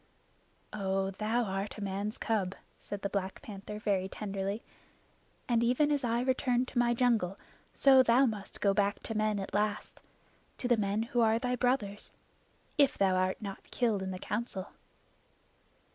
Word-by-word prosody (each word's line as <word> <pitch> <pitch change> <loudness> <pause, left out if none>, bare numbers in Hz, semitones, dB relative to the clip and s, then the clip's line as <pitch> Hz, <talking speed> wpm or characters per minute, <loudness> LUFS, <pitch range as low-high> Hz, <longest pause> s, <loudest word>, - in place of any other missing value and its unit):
"Oh, 195 -1 -1
thou 220 +5 0
art 195 0 -3
a 210 - -5
man's 200 +2 -3
cub," 200 -4 -1 0.2
said 205 -1 -7
the 200 - 0
Black 195 -1 -3
Panther 210 0 -7
very 195 -3 0
tenderly. 200 +1 -3 0.8
"And 235 -1 +2
even 255 +5 +3
as 285 -2 +1
I 235 0 +1
returned 255 -1 +1
to 240 - -1
my 240 0 +3
jungle, 225 -7 +2 0.3
so 270 -1 +6
thou 255 +2 +5
must 210 -5 -4
go 200 -1 +4
back 200 0 +1
to 225 - -4
men 215 -1 +1
at 195 - -6
last 210 0 -1 0.6
to 245 - -2
the 245 - +5
men 210 0 0
who 240 +1 0
are 225 0 +4
thy 250 +1 -1
brothers 245 -5 -1 0.7
if 280 -2 +4
thou 195 -1 +3
art 185 +3 0
not 195 -1 -7
killed 225 -5 +1
in 190 - -3
the 185 - -4
Council." 205 -1 -3
210 Hz, 165 wpm, -31 LUFS, 195-240 Hz, 0.8 s, so